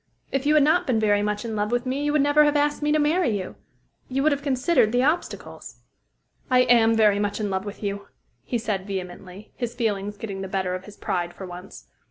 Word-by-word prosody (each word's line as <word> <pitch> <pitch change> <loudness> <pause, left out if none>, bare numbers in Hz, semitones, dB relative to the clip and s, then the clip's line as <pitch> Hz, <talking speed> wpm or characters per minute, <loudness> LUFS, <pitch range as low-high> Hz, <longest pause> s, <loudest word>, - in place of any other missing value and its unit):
If 275 +1 -1
you 305 - +4
had 300 - +6
not 315 +5 +3
been 240 -4 +2
very 205 -1 +2
much 210 +1 -2
in 225 -1 -4
love 210 +1 -1
with 245 +1 0
me, 265 +3 -2
you 295 - +1
would 295 -1 +3
never 290 +1 +5
have 295 0 +2
asked 290 0 +1
me 295 0 +1
to 305 - +3
marry 300 - +2
you. 185 -1 -6 0.6
You 270 +1 0
would 310 - +4
have 285 0 -1
considered 270 -3 +2
the 245 +1 +2
obstacles." 305 +5 -3 0.7
"I 255 -1 +5
am 230 -2 +4
very 210 -2 +4
much 205 0 -1
in 205 -2 -2
love 190 +1 -2
with 205 +1 -8
you," 200 0 -4 0.4
he 245 - -2
said 210 -4 -3
vehemently, 185 +1 -7
his 240 -1 -4
feelings 205 -3 -2
getting 200 -2 -6
the 190 - -4
better 190 -1 -2
of 185 +1 -5
his 210 -1 -13
pride 175 -1 -3
for 190 - -8
once. 180 +1 -10
225 Hz, 235 wpm, -24 LUFS, 200-275 Hz, 0.7 s, had